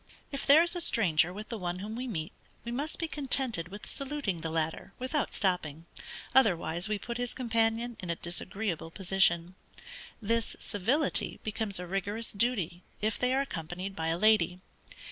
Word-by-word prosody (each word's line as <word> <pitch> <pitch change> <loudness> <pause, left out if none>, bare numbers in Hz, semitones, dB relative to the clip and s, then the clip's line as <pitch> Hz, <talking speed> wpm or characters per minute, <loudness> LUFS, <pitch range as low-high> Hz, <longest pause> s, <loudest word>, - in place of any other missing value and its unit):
If 275 - -4
there 300 +4 +8
is 345 +1 +1
a 350 - +2
stranger 175 - +4
with 210 +4 -8
the 230 -2 -4
one 175 -1 -2
whom 210 +4 -5
we 255 +2 -4
meet, 160 -9 -3 0.3
we 235 - -4
must 285 +6 -2
be 330 - -1
contented 265 - 0
with 205 +3 -9
saluting 275 - -3
the 160 - -3
latter 160 +4 -2
without 260 +3 -1
stopping, 170 -5 0 0.5
otherwise 175 -7 +3
we 210 - +1
put 235 +3 -5
his 245 -1 -2
companion 230 -1 +1
in 180 - -6
a 170 - +1
disagreeable 175 0 -1
position. 185 -1 +2 0.7
This 230 +1 0
civility 250 - 0
becomes 215 -2 -2
a 180 - -5
rigorous 200 +5 -2
duty 200 -6 0 0.2
if 215 0 -1
they 250 0 +2
are 265 +1 +3
accompanied 180 - -5
by 160 0 -2
a 165 +1 +1
lady. 215 -3 +4
205 Hz, 170 wpm, -30 LUFS, 175-245 Hz, 0.7 s, there